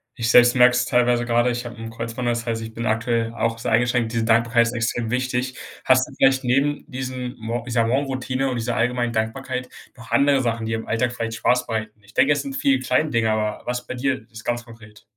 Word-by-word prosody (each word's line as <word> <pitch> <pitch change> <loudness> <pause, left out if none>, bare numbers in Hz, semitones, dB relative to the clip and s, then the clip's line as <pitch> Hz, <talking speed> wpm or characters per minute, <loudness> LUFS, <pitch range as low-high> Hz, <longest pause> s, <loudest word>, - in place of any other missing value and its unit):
ich 115 -1 -1
selbst 120 +1 +6
merke's 125 0 +5
teilweise 120 -1 +2
grade. 120 +1 +2
Ich 120 0 -4
hab 120 0 -8
'n 115 0 -7
Kreuzbandriss, 115 +1 -3
das 115 - -8
heißt, 115 -1 -1
ich 110 0 -7
bin 115 +1 -5
aktuell 115 +1 0
auch 115 0 -1
sehr - - -3
eingeschränkt. 120 0 +1
Diese 115 -1 0
Dankbarkeit 115 +1 +3
ist - - -2
extrem 115 -1 -2
wichtig. 130 0 -1 0.3
Hast 130 0 +4
du 150 - -13
vielleicht 135 -1 +3
neben 140 +5 0
diesen 130 -1 -5
Mor 115 +1 -4
ich 125 - -4
sage 115 -1 +2
„Morgenroutine“ 135 0 -1
und 130 - -2
dieser 120 0 -2
allgemeinen 120 0 0
Dankbarkeit 120 +3 -3 0.3
noch 115 -1 -13
andere 140 +3 +4
Sachen, 115 -2 -1
die 115 - -2
im 110 0 -4
Alltag 120 +2 0
vielleicht 115 -2 -4
Spaß 125 +3 +1
bereiten? 110 -1 -4
Ich 100 +2 -19
denke, 140 - +4
es - - -1
sind 275 -1 -6
viele 275 -1 +2
kleine 155 - +1
Dinge, 115 -4 +1
aber 105 -1 -2
was 125 0 -3
bei - - -5
dir 130 -2 -2
ist 110 0 -11
ganz 120 0 -1
konkret? 110 -3 -15
120 Hz, 230 wpm, -22 LUFS, 115-125 Hz, 0.3 s, selbst